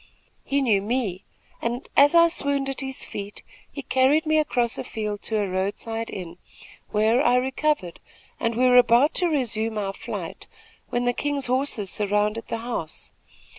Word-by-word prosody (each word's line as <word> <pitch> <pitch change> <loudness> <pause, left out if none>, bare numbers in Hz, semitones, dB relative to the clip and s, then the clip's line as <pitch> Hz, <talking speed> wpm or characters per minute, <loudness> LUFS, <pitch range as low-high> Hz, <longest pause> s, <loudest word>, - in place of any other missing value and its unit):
He 280 0 0
knew 210 -6 +3
me, 210 -4 -2 0.4
and, 240 +2 -3
as 290 +4 +6
I 335 0 +8
swooned 280 -4 -1
at 270 - -3
his 265 -1 -4
feet, 200 0 -7 0.3
he 280 - -7
carried 265 +6 +3
me 310 0 +3
across 245 -6 +1
a - - -3
field 210 -2 -4
to 220 - -2
a 205 - 0
road 190 +2 -1
side 225 0 -4
inn, 175 -2 -7 0.5
where 220 +5 +2
I 245 -2 +4
recovered, 260 - 0 0.4
and 230 0 -1
we 250 +2 +2
were 250 0 +6
about 245 +4 +4
to 355 -2 +2
resume 225 -7 0
our 195 -2 -2
flight, - - -7 0.4
when 240 0 -1
the 245 - +2
king's 285 0 -2
soldiers 250 -6 0
surrounded 210 +2 0
the 230 - -3
house. 230 -9 -5
240 Hz, 170 wpm, -24 LUFS, 210-270 Hz, 0.5 s, I